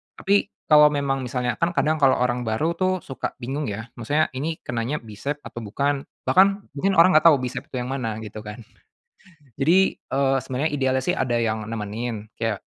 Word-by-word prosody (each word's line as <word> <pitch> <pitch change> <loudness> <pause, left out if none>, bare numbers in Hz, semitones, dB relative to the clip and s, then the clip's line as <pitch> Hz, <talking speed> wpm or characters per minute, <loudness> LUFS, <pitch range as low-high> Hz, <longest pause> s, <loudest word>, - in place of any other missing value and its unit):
Tapi 200 +1 +2 0.2
kalau 150 0 +9
memang 140 -2 0
misalnya 125 -1 -2
kan 170 +1 0
kadang 155 -1 +1
kalau 135 -2 +5
orang 125 -1 -1
baru 150 +10 0
tuh 185 0 +2
suka 135 - -5
bingung 135 +3 -4
ya, 110 +3 -6
maksudnya 150 +7 +1
ini 150 +5 -3
kenanya 120 +5 -2
bisep 115 +7 -4
atau - - -8
bukan. 140 +6 -2 0.2
Bahkan 185 +10 +6 0.3
mungkin 190 +7 0
orang 170 +2 +7
gak - - +5
tahu 160 - +8
bisep 125 0 -5
itu - - -10
yang 125 - -5
mana 115 -5 -2
gitu 110 0 -8
kan. 105 +2 -9 0.9
Jadi, 175 +7 +3
eee, 135 0 +1
sebenarnya 135 +5 -2
idealnya 130 -2 +1
sih 180 - +2
ada 120 -6 0
yang 110 -2 -1
nemenin 110 0 -4
kayak 115 -3 -3
130 Hz, 185 wpm, -23 LUFS, 115-150 Hz, 0.9 s, kalau